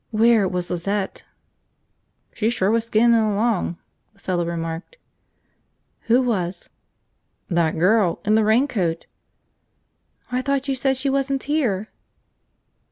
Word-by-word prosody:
Where 225 -2 +3
was 180 -1 -3
Lizette? 195 +3 -3 1.1
"She 220 0 0
sure 205 -4 +1
was 230 0 +1
skinnin' 230 +1 +4
along," 210 -4 0 0.4
the 200 - -28
fellow 180 -3 -1
remarked. 165 - -5 1.1
"Who 240 +3 +4
was?" 190 -7 -3 0.8
"That 170 -3 +1
girl. 185 +1 +2
In 210 - +2
the 220 0 +4
raincoat." 215 - +1 1.3
"I 250 0 0
thought 275 0 -1
you 275 - +1
said 265 0 0
she 270 +1 -1
wasn't 275 0 -1
here!" 240 -9 -1
215 Hz, 115 wpm, -22 LUFS, 180-250 Hz, 1.3 s, skinnin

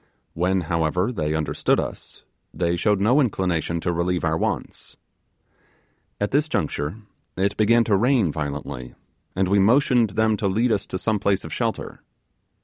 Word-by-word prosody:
When, 90 +2 +1
however, 85 +5 0
they 80 -9 -2
understood 80 -1 0
us, - - -7 0.3
they 85 -1 -1
showed 105 +3 +1
no 120 +9 +4
inclination 90 - -1
to 85 - -1
relieve 85 +1 -1
our 80 -1 +1
wants. - - -4 1.2
At 105 - -1
this 150 +3 +1
juncture 75 - -2 0.4
it 100 +2 0
began 115 +2 +4
to 105 -3 +2
rain 115 - +2
violently, 70 -4 -5 0.4
and 95 0 +1
we 100 +2 +3
motioned 120 +2 +4
them 110 -1 +2
to 100 - -1
lead 115 +5 +1
us 105 -2 0
to - - -4
some 110 +2 0
place 100 -1 +1
of - - -7
shelter. - - -3
95 Hz, 155 wpm, -23 LUFS, 85-110 Hz, 1.2 s, no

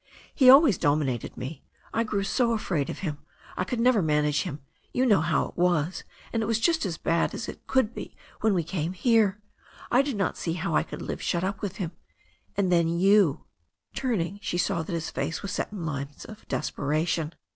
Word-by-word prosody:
He 260 -2 +6
always 270 - +7
dominated 145 -6 0
me. 135 +3 -6 0.3
I 230 - +2
grew 205 -3 -1
so 235 +4 +1
afraid 160 -10 -1
of - - -5
him. 150 -3 -3 0.4
I - - 0
could 235 +5 -3
never 240 -3 +4
manage 150 -2 +2
him 155 -6 -5 0.2
— - - -31
^you 255 +1 +3
know 205 -7 +5
how 160 -2 +1
I - - -12
was 175 -1 +1 0.2
— - - -23
^and 230 - +1
it 215 - -1
was 230 -1 +1
just 325 - +2
as 165 -4 -4
bad 165 0 0
as - - -5
it - - -9
could 260 -4 +2
be - - -8 0.2
when 220 -3 +2
we 170 - +1
came 170 +1 -3
here. 210 -1 +3 0.5
I 250 - +6
did 280 -3 -2
not 195 - 0
see 165 - -2
how 180 +3 -2
I - - +4
could - - -7
live - - -4
shut 175 -1 0
up 195 +1 -2
with 200 -3 -3
him 180 -5 -3 0.3
— - - -36
^and 190 -3 +2
then 170 -2 +4
you 180 -1 +3 0.3
'* - - -52
Turning, 205 -7 -1
she 175 - -2
saw 170 -1 +1
that 160 - -5
his 165 -1 -3
face 165 - -3
was 200 - -4
set - - -2
in 195 -5 -5
lines 140 -2 -5
of 215 -1 -12
despera 150 +3 -1
tion. 165 -1 -1
180 Hz, 225 wpm, -27 LUFS, 160-220 Hz, 0.5 s, always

